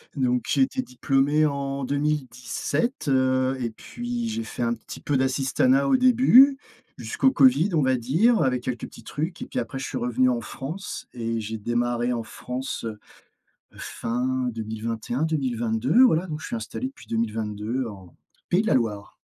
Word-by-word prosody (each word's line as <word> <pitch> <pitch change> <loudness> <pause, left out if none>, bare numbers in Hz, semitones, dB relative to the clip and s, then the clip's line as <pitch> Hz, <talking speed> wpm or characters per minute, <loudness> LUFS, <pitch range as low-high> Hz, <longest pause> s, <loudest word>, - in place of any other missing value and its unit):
donc 125 -3 +1
j'ai - - +2
été 265 0 +1
diplômé 140 - +1
en 140 -1 -2
2017, 150 - -2
heu, 130 -1 +2
et 120 -2 -2
puis 240 - -5
j'ai 225 +1 -3
fait - - -7
un 120 0 +1
petit - - -10
peu 145 - 0
d'assistanat 130 0 +2
au - - +4
début. 255 +2 +6 0.4
Jusqu'au 350 -11 +1
covid, 140 - +5
on 160 - +3
va 130 -1 +3
dire 160 - +3
avec 125 -2 +1
quelques 125 -2 -3
petits - - -13
trucs 165 +6 -4
et - - -3
puis - - -7
après 135 - -3
je 135 - -4
suis - - -4
revenu 125 +1 +2
en 120 -2 0
France 155 - -6
et 115 -1 -2
j'ai 110 +1 -4
démarré 120 +2 0
en 120 - -2
France, 125 +3 -5
heu, 110 -2 -5 0.8
fin 125 +2 -2
2021-2022, 115 - 0
voilà, 175 -7 +3
donc 155 -3 -5
je - - -7
suis 240 - -3
installé 255 +3 -4
depuis 275 - -16
2022 110 +2 -2
en, 95 -5 -11 0.3
Pays 180 +4 +3
de - - -5
la - - +3
Loire. 105 -5 -1
130 Hz, 170 wpm, -25 LUFS, 120-160 Hz, 0.8 s, début